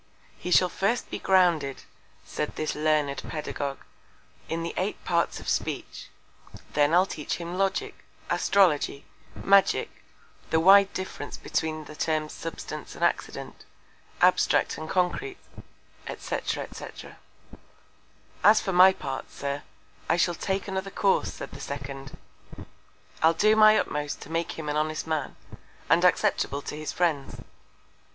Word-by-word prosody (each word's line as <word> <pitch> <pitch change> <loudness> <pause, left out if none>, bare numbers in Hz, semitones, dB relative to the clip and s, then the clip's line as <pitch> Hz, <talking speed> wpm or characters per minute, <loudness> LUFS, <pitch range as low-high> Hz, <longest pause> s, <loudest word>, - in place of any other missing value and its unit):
He - - -5
shall 180 0 +5
first 200 +7 -1
be - - -3
grounded, 170 -8 +2 0.4
said 150 - -4
this 155 - -2
learned 150 -2 +1
Pedagogue, 145 -2 -4 0.7
in 165 0 -2
the 170 - -4
Eight 190 +3 -3
Parts 170 -1 0
of - - -11
Speech; - - -3 0.6
then 145 0 +3
I'll 180 +3 +5
teach 150 -6 -4
him 170 +1 -6
Logic, 195 +1 0 0.3
Astrology, 160 -7 +2 0.4
Magick, 195 0 +4 0.6
the 160 - +3
wide 195 +3 +7
Difference 185 -6 -5
between 155 -1 -3
the 150 - -11
Terms 155 -1 -1
Substance 165 - -7
and - - -5
Accident, - - -3 0.6
Abstract - - +3
and 155 0 -7
Concrete, 275 - -1 0.8
&c. - - -3
&c. - - -4 1.6
As 215 +1 +7
for 190 - -3
my 185 +2 +8
Part, 135 -6 -6
Sir, 140 0 -4 0.5
I 165 - +3
shall 175 0 +2
take 190 +3 -2
another 190 0 -3
Course, 195 0 +1
said - - -8
the - - -10
second; 135 -1 -7 1.0
I'll 160 +1 +5
do 215 +5 +4
my 215 0 +7
utmost 150 -1 -2
to 155 - -10
make 165 0 -1
him 160 -2 -7
an 150 0 -1
honest 155 0 -1
Man, 155 -3 -2 0.6
and - - +5
acceptable 140 0 +2
to - - -5
his 155 0 -4
Friends. 160 -6 -1
165 Hz, 135 wpm, -27 LUFS, 150-190 Hz, 1.6 s, my